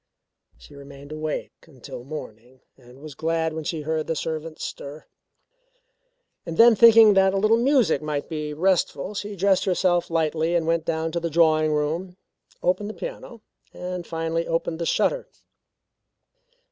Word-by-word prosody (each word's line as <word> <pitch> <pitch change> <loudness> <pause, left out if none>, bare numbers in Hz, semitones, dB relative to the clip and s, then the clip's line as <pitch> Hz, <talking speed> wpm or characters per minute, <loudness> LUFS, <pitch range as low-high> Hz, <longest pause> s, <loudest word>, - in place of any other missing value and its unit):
She - - -17
remained 140 0 -12
awake 155 0 -4 0.2
until 130 -4 -10
morning 125 -3 -10
and 125 +2 -17
was 155 -2 -8
glad 160 +2 -1
when 160 0 -5
she 155 +1 -3
heard 155 +1 -2
the 165 - -1
servants 160 0 -5
stir. 145 +2 -8 1.4
Then 225 +8 +5
thinking 225 -1 +8
that 190 0 +3
a - - +1
little 215 +3 +3
music 245 - +2
might 150 -2 -3
be 150 -1 -4
restful, 180 +2 0
she 205 0 -5
dressed 195 0 +2
herself 180 -2 +1
lightly 165 0 0
and 165 -2 +1
went 165 0 0
down 165 0 -2
to 170 - -2
the 170 0 -3
drawing 155 -1 +3
room, 160 +5 -2 0.5
opened 205 +3 0
the 215 - -7
piano - - -8 0.3
and 180 -1 -6
finally 165 0 -2
opened 165 0 -2
the 170 - -2
shutter. - - 0
165 Hz, 150 wpm, -24 LUFS, 155-185 Hz, 1.4 s, thinking